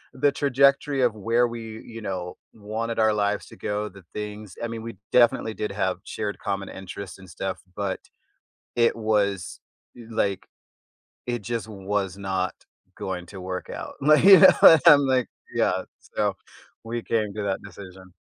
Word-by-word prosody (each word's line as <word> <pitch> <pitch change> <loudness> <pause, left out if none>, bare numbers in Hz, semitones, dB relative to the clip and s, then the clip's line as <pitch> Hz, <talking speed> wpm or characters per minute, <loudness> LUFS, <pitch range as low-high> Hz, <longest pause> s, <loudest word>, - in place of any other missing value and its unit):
the 140 +2 +3
trajectory 140 0 +2
of 120 -3 +2
where 115 +4 +2
we, 115 -1 -7
you 115 -1 -9
know, 90 -3 -5 0.2
wanted 110 +2 -4
our 110 -1 +4
lives 105 0 -1
to - - -13
go, 105 0 -3
the 100 -1 -15
things 105 -2 -7
I - - 0
mean, 115 -1 -6
we 115 0 -7 0.2
definitely 120 -2 +3
did 105 - -3
have - - -1
shared 105 0 -4
common 100 -1 -3
interests 95 0 -8
and 95 -1 -14
stuff, 95 +2 -4 0.2
but 100 -2 -2 0.8
it 115 -1 +3
was 105 -4 0 0.4
i - - -12
like, 100 -4 -1 0.8
it 120 -1 -2
just 115 +2 -3
was 100 -2 -3
not 95 -2 -2 0.4
going 90 -2 -4
to 95 +1 -10
work 90 0 -5
out. - - -7
Like, 150 +2 +5
you 195 -1 +10
know, 160 - +9
I'm 150 -4 +9
like 130 -2 +2 0.3
yeah, - - +1 0.2
so - - -2 0.5
we 115 +1 -4
came 110 -3 -1
to 105 - -3
that 100 -1 -2
decision. 95 -1 -12
105 Hz, 165 wpm, -25 LUFS, 95-115 Hz, 0.8 s, you